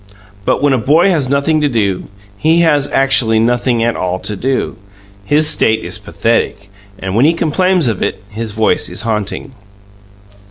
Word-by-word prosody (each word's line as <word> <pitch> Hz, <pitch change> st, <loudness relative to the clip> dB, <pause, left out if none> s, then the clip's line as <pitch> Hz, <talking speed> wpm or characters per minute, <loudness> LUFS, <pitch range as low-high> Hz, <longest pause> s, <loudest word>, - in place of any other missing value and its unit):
But -, -, 0 dB
when 145 Hz, -2 st, +3 dB
a 130 Hz, -, +1 dB
boy 155 Hz, -, +3 dB
has 145 Hz, -7 st, 0 dB
nothing 140 Hz, +3 st, +1 dB
to 145 Hz, -, +1 dB
do, 100 Hz, -7 st, -1 dB, 0.3 s
he 160 Hz, +9 st, +2 dB
has 145 Hz, -4 st, +2 dB
actually 135 Hz, -5 st, +2 dB
nothing 120 Hz, +1 st, +1 dB
at 120 Hz, 0 st, 0 dB
all 90 Hz, 0 st, -2 dB
to 105 Hz, -, -3 dB
do; 130 Hz, +6 st, -2 dB, 0.5 s
his 150 Hz, +7 st, +3 dB
state 110 Hz, -6 st, +2 dB
is -, -, -3 dB
pathetic, 100 Hz, 0 st, -2 dB, 0.3 s
and 95 Hz, -1 st, -4 dB
when 120 Hz, +5 st, +4 dB
he 160 Hz, -, +4 dB
complains 175 Hz, +2 st, +1 dB
of 110 Hz, -5 st, -2 dB
it -, -, -3 dB
his 110 Hz, +1 st, -5 dB
voice 110 Hz, +1 st, 0 dB
is 110 Hz, -, -5 dB
haunting. 110 Hz, +4 st, -3 dB
125 Hz, 170 wpm, -14 LUFS, 110-150 Hz, 0.5 s, when